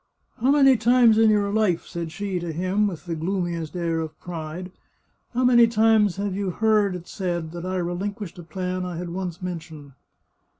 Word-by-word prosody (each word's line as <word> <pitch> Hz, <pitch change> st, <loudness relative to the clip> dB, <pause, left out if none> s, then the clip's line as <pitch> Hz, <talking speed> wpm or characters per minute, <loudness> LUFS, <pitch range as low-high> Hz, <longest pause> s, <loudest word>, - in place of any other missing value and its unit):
" -, -, -43 dB
How 255 Hz, -, +3 dB
many 270 Hz, -2 st, +6 dB
times 235 Hz, -1 st, +5 dB
in 225 Hz, -1 st, +6 dB
your 205 Hz, -1 st, +2 dB
life," 210 Hz, -6 st, +1 dB
said 170 Hz, -2 st, -5 dB
she 195 Hz, 0 st, -3 dB
to 170 Hz, -1 st, -4 dB
him, 185 Hz, +6 st, 0 dB
with 180 Hz, -3 st, -6 dB
the 170 Hz, -, -3 dB
gloomiest 170 Hz, -1 st, -3 dB
air 170 Hz, -2 st, -1 dB
of 160 Hz, -1 st, -6 dB
pride, 175 Hz, +1 st, -6 dB, 0.3 s
" -, -, -44 dB
how 255 Hz, -, +2 dB
many 240 Hz, -2 st, +6 dB
times 220 Hz, -3 st, +3 dB
have 200 Hz, 0 st, -2 dB
you 195 Hz, 0 st, -2 dB
heard 210 Hz, 0 st, +2 dB
it 175 Hz, -1 st, -8 dB
said 175 Hz, -4 st, -3 dB
that 175 Hz, +1 st, -6 dB
I 185 Hz, 0 st, -2 dB
reHnquished 180 Hz, +2 st, -4 dB
a -, -, -8 dB
plan 185 Hz, +2 st, -3 dB
I 180 Hz, -2 st, -5 dB
had 175 Hz, 0 st, -5 dB
once 180 Hz, -1 st, -5 dB
mentioned 160 Hz, -5 st, -7 dB
185 Hz, 200 wpm, -24 LUFS, 170-210 Hz, 0.3 s, many